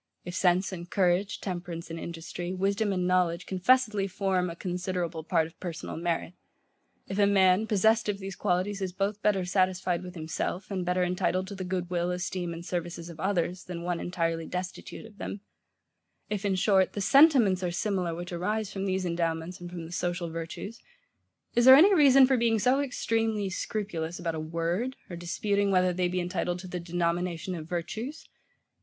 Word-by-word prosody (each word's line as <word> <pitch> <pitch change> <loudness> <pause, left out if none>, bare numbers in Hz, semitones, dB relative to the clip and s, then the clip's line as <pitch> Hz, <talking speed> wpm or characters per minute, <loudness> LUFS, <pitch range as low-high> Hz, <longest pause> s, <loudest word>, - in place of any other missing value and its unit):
If 175 - -6
sense 185 +1 +2
and 175 -1 -7
courage, 190 +1 +1
temperance 175 -3 -5
and 165 - -5
industry, 175 +2 -5
wisdom 200 +2 +1
and 180 -2 0
knowledge 180 -1 +1
confessedly 210 +1 +2
form 185 -2 0
a 170 - -6
considerable 180 -2 -3
part 165 -1 +2
of 165 - -13
PERSONAL 170 -4 -5
MERIT: 170 0 -2 0.7
if 195 +1 -3
a 200 - +5
man, 195 +1 +4
possessed 220 +2 +3
of 205 - 0
these 195 -1 -6
qualities, 190 +3 0
is 185 -2 -2
both 200 +2 -2
better 195 -3 +2
satisfied 185 -1 +1
with 180 0 -9
himself, 170 +4 -4
and 185 -2 -2
better 180 0 +2
entitled 180 +1 0
to - - -6
the 190 - -5
good 180 -1 -3
will, 175 0 0
esteem, 180 -1 -3
and 170 +1 -7
services 170 -1 -4
of 165 - -13
others, 180 -1 -1
than 170 -2 -6
one 175 -1 -1
entirely 165 -2 -2
destitute 180 +4 -6
of 210 -2 -15
them; 200 - -5 0.9
if, 205 -1 -2
in 195 -1 +2
short, 190 0 +3
the - - -4
SENTIMENTS 255 - +6
are 180 - 0
similar 180 -1 -1
which 175 +1 -6
arise 210 +3 -2
from 195 0 -3
these 190 0 0
endowments 170 0 -2
and 175 - -7
from 175 -2 -7
the 165 - -10
social 175 -1 -2
virtues; 165 +7 -6 0.7
is 240 - +3
there 260 0 +11
any 370 +8 +7
reason 275 -5 +7
for 260 0 +2
being 230 -1 +2
so 250 +6 +3
extremely 225 -6 -1
scrupulous 175 -5 -3
about 170 -1 -2
a 160 - -4
WORD, 170 +10 -2 0.2
or - - -4
disputing 200 +4 0
whether 185 -1 +3
they 180 0 +1
be 180 +1 -1
entitled 175 0 -1
to 185 +1 -9
the 180 0 -4
denomination 175 +1 -1
of 160 -2 -7
virtues? 220 - -4
180 Hz, 185 wpm, -28 LUFS, 175-200 Hz, 0.9 s, there